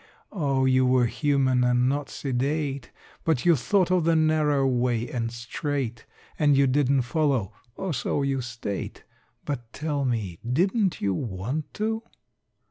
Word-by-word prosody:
Oh, 140 -8 0
you 130 0 +4
were 125 -1 +4
human 130 -1 +1
and 125 0 +3
not 140 +1 -1
sedate, 140 0 -2 0.3
But 155 -7 0
you 170 -2 +6
thought 185 - +1
of 180 -2 +3
the 165 0 +3
narrow 155 -3 +2
way 120 -2 +1
and 115 -2 -3
straight, 120 0 -4 0.3
And 145 -3 +4
you 140 - +5
didn't 135 0 +2
follow 130 - 0 0.2
(or 190 -3 -3
so 140 +1 -1
you 135 -1 0
state), 120 -5 -5 0.4
But 120 -6 -4
tell 150 -1 -2
me 110 -9 -2
didn't 180 - +1
you 100 -1 +1
want 115 - -4
to? 220 +1 -1
135 Hz, 145 wpm, -26 LUFS, 120-150 Hz, 0.4 s, you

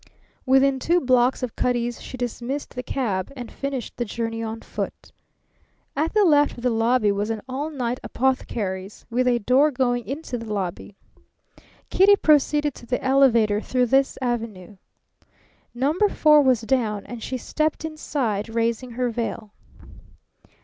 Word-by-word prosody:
Within 265 0 +4
two 345 +6 +2
blocks 255 -2 +2
of 245 - -4
Cutty's 240 -1 -1
she 255 - -8
dismissed 250 +3 -4
the 250 - -4
cab 210 -9 -2
and 245 -3 -8
finished 275 -4 -5
the 240 - 0
journey 225 0 -4
on 225 0 -5
foot. - - -6 0.8
At 310 +4 0
the 420 -2 +5
left 290 -5 +3
of 240 - -9
the 250 - +2
lobby 225 -1 +2
was 205 +2 -2
an 220 -2 -3
all 275 +4 -3
night 250 -4 -3
apothecary's, 210 -7 -2
with 250 +2 +1
a 245 -1 +3
door 255 +7 +3
going 245 -3 -1
into 275 -3 -4
the 225 -1 -7
lobby. 195 0 -4 1.0
Kitty 400 +2 +6
proceeded 295 -3 +3
to 240 - -14
the 250 - -2
elevator 235 -6 +4
through 250 +1 +1
this 270 +3 +2
avenue. 220 -5 -4 1.0
Number 305 - +2
Four 300 -4 +5
was 255 -4 +3
down, 220 -3 -1
and 240 -2 -8
she 260 - -3
stepped 310 +5 -2
inside, 260 -9 -2
raising 230 +2 -1
her 245 0 -1
veil. 225 -2 -4
250 Hz, 150 wpm, -23 LUFS, 225-275 Hz, 1.0 s, Kitty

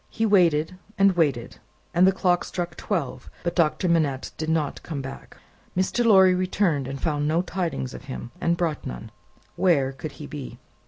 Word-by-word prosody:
He 225 - -1
waited 180 -4 +3 0.2
and 195 0 +5
waited, 140 -9 0 0.3
and 180 +2 +5
the - - +6
clock 180 -2 +1
struck 175 -1 -4
twelve; 155 -10 -3
but 170 -1 -2
Doctor 170 +1 +2
Manette 155 -6 +1
did 160 0 -4
not 160 -3 0
come 155 -4 -5
back. 135 0 -9 0.4
Mr. 190 +6 +1
Lorry 190 -5 +6
returned, 180 -6 0
and 135 0 -5
found 145 -1 0
no 165 +3 +2
tidings 170 -8 -3
of - - -10
him, 130 -3 -7
and 170 0 +1
brought 165 -4 -1
none. - - -7 0.4
Where 150 -8 +3
could 140 +2 -7
he 150 - -9
be? 140 -5 -7
165 Hz, 175 wpm, -25 LUFS, 140-185 Hz, 0.4 s, the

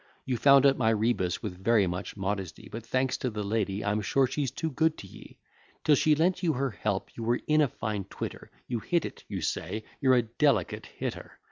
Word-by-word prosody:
You 130 - 0
found 140 +2 +6
out 135 -1 +4
my 110 -3 +3
rebus 110 -5 0
with 95 -3 -6
very 115 -2 +4
much 90 +4 -4
modesty; 95 -2 -4
But 115 +1 -6
thanks 130 +3 0
to 130 - -2
the 105 -2 -4
lady; 100 -1 -1
I'm 105 +1 +1
sure 130 +6 +2
she's 135 +1 -1
too 160 +5 -3
good 160 +3 +1
to - - -9
ye: - - -14 0.5
Till 150 - +5
she 150 +2 +4
lent 175 +4 +1
you 170 -4 +2
her 135 -1 -1
help, 100 -2 -3
you - - -7
were 120 +2 +1
in 155 0 +4
a 150 - +4
fine 105 -5 -4
twitter; - - -7 0.2
You 120 -2 -2
hit 170 +7 0
it, - - -8
you - - -4
say; 110 +1 -3 0.2
you're 130 -1 +4
a 120 - +3
delicate 115 - 0
hitter. - - -6
115 Hz, 220 wpm, -28 LUFS, 105-140 Hz, 0.5 s, found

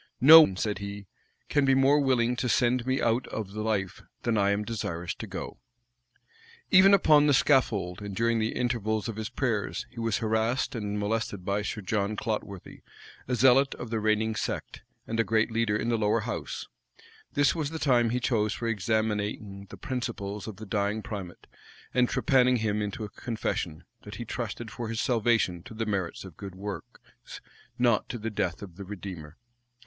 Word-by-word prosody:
"No 155 +6 +11
one," 95 -12 +2
said 105 0 -1
he, 100 0 -6 0.4
"can 145 - +2
be 135 -1 +4
more 135 +2 +4
willing 125 -3 +2
to 125 - -1
send 120 +1 +2
me 130 0 +1
out 115 +2 +1
of 105 -3 -5
life, 105 -3 -2 0.2
than 120 -2 +1
I 100 -1 +3
am 100 +1 +1
desirous 95 -7 -3
to - - -8
go," - - -7 1.1
Even 195 +1 +8
upon 150 -6 +5
the 145 - +5
scaffold, 105 -10 +2
and 100 -1 -6
during 115 +2 +1
the 110 +1 -1
intervals 110 -3 -1
of 115 - -4
his 110 0 -4
prayers, 115 -7 -2
he 120 - -10
was 115 -2 0
harassed 110 +3 0
and 105 -3 -3
molested 105 -2 -2
by 100 +1 0
Sir 105 +1 -4
John 100 +1 -1
Clotworthy, 100 -4 -5 0.5
a 125 - 0
zealot 130 +3 +4
of 125 - -8
the 115 - 0
reigning 110 +1 +1
sect, - - -4 0.2
and 115 0 -3
a - - +5
great 110 0 +1
leader 110 -2 +1
in 115 - -2
the 115 -1 +1
lower 105 +1 +2
house: 120 +3 -5 0.7
this 145 -1 +3
was 155 -4 -2
the 160 - -5
time 125 -6 +3
he 125 +2 0
chose 110 -4 +1
for 115 - -4
examining 105 -2 -2
the - - -10
principles 115 -7 -4
of 110 - -6
the 110 - -9
dying 105 +1 -1
primate, 95 -5 -7 0.5
and 125 -1 +3
trepanning 130 -1 +3
him 105 -2 -1
into 105 +2 -4
a 105 - -5
confession, 105 -8 -4 0.2
that 105 -1 -9
he 120 - -6
trusted 115 -1 -5
for 115 -2 -5
his 115 0 -3
salvation 115 -8 +1
to 110 +4 -11
the 115 +1 -2
merits 95 -4 -3
of 90 -5 -12
good 95 -2 -8
works, 100 -2 -9 0.4
not 120 -3 +2
to 120 - -4
the 115 0 -4
death 90 -3 -2
of 90 -4 -11
the 100 - -7
Redeemer. 90 -5 -8
110 Hz, 185 wpm, -28 LUFS, 100-120 Hz, 1.1 s, No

